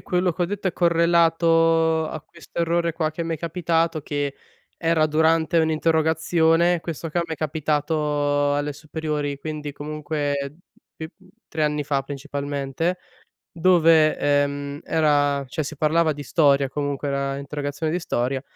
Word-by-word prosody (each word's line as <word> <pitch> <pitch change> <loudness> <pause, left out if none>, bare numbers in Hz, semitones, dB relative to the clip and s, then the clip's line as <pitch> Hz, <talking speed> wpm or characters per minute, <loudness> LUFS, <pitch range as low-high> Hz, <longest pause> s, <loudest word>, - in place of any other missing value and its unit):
quello 180 -1 0
che 170 - -11
ho - - +4
detto, 200 +1 -2
è - - -4
correlato 165 -1 +3
a 155 - -5
questo 170 +1 -8
errore 170 0 0
qua 160 -2 -1
che 160 +2 -5
m'è 165 -1 -2
capitato, 165 0 0
che 145 -1 -3 0.4
era 165 -2 +2
durante 160 +2 +2
un'interrogazione. 160 +1 +2
Questo 165 -1 -5
qua 175 +3 0
mi 165 - -4
è - - -17
capitato 150 -1 0
alle 145 0 -1
superiori, 150 -1 -4
quindi, 150 -1 -5
comunque 145 -1 -3 0.4
bi 160 - -6 0.4
3 155 - -3
anni 150 -1 0
fa 140 -1 0
principalmente. 145 +4 -3 0.5
Dove, 165 -3 +4
ehm, 145 0 0
era 145 -3 +1
cioè 145 +4 -3
si 150 +1 -6
parlava 155 +1 +2
di 145 - -7
storia 140 -2 +2
comunque, 145 0 -3
era 140 0 -1
interrogazione 145 +2 -4
di 175 - 0
storia, 130 -3 -2
155 Hz, 140 wpm, -23 LUFS, 145-165 Hz, 0.5 s, ho